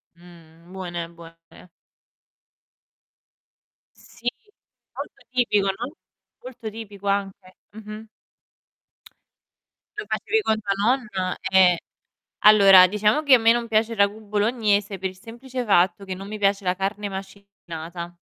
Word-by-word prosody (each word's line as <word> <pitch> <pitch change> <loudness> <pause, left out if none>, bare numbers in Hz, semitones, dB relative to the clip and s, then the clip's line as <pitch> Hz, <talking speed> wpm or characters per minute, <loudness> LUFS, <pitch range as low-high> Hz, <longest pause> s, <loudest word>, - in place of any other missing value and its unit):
Mh, 170 0 -18
buone, 175 -3 -5
buone. 165 0 -13 2.6
Sì 240 +1 -5 0.6
molto - - -9
tipico, 235 -6 +1
no, 230 +8 -3 0.5
molto 245 -3 -8
tipico 205 -2 -9
anche. 195 -2 -3
Mh-mh. 215 +1 -10 1.9
Lo 420 - -4
facevi 440 0 0
con 220 - 0
tua 200 -2 -3
nonna? 210 -5 -1
Eh. 185 -2 +5 0.7
Allora, 195 -3 +8
diciamo 210 +9 +1
che 280 -3 +5
a - - +9
me 225 +1 +5
non 235 0 0
piace 220 +1 +1
il - - -9
ragù 200 +2 +1
bolognese 210 -1 0
per 190 0 -2
il 185 - -15
semplice 245 +4 -7
fatto 190 0 +2
che 190 - -5
non 195 +2 -8
mi 215 +1 -6
piace 200 0 +1
la 180 0 0
carne 200 +2 -3
macinata. 180 -3 -9
200 Hz, 125 wpm, -23 LUFS, 185-220 Hz, 2.6 s, a